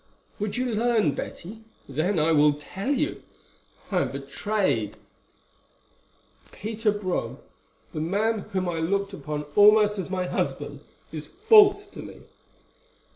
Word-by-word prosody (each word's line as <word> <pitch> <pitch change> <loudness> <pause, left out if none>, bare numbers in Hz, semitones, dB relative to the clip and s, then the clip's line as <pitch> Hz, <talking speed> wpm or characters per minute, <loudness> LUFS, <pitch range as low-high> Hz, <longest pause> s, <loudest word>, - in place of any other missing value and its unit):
"Would 210 +2 -2
you 255 - 0
learn, 225 - +2
Betty? 210 +10 -7 0.2
Then 160 +8 0
I 160 +1 +3
will 150 -1 +5
tell 185 - -6
you. 290 +1 0 0.7
I 185 - +2
am - - -2
betrayed. 140 - -1 1.5
Peter 220 0 -1
Brome, 200 -3 -3 0.6
the 155 - -3
man 210 +7 0
whom 185 -2 -1
I 170 -2 -2
looked 200 +4 -1
upon 150 -5 -4
almost 210 0 +6
as 185 - -4
my 185 -1 -1
husband, - - -3 0.3
is - - -6
false 410 -2 +5
to - - -11
me." - - -11
200 Hz, 130 wpm, -25 LUFS, 160-220 Hz, 1.5 s, almost